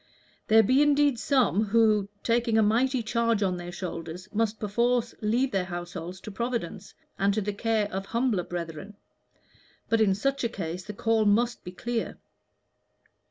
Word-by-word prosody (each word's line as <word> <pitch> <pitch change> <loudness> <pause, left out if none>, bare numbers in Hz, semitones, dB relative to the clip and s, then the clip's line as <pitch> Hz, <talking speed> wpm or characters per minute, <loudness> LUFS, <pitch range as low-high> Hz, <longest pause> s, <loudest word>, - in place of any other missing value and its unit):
There 220 +1 +6
be 260 +7 +4
indeed 290 -3 +3
some 240 - +2
who, 215 -2 +3
taking 230 -1 +2
a 220 - +5
mighty 245 +4 +2
charge 230 -1 +1
on 185 -2 0
their 175 0 -7
shoulder, 170 -3 -5 0.2
must 220 0 0
perforce 235 +3 0
leave 240 +5 +1
their 190 -2 0
households 175 0 -6
to 215 - -8
Providence, 235 -3 -4 0.2
and 195 +1 +3
to - - +1
the 205 +1 -2
care 220 0 0
of 195 +1 -4
humbler 230 -5 0
brethren, 175 +4 -6 0.9
but 225 0 +3
in 195 -3 +4
such 275 +6 -1
a 235 - +1
case 180 -4 -5
the 210 - -6
call 225 +1 +1
must 235 +4 +2
be 180 - -7
clear." 235 +5 -3
215 Hz, 160 wpm, -27 LUFS, 195-235 Hz, 0.9 s, There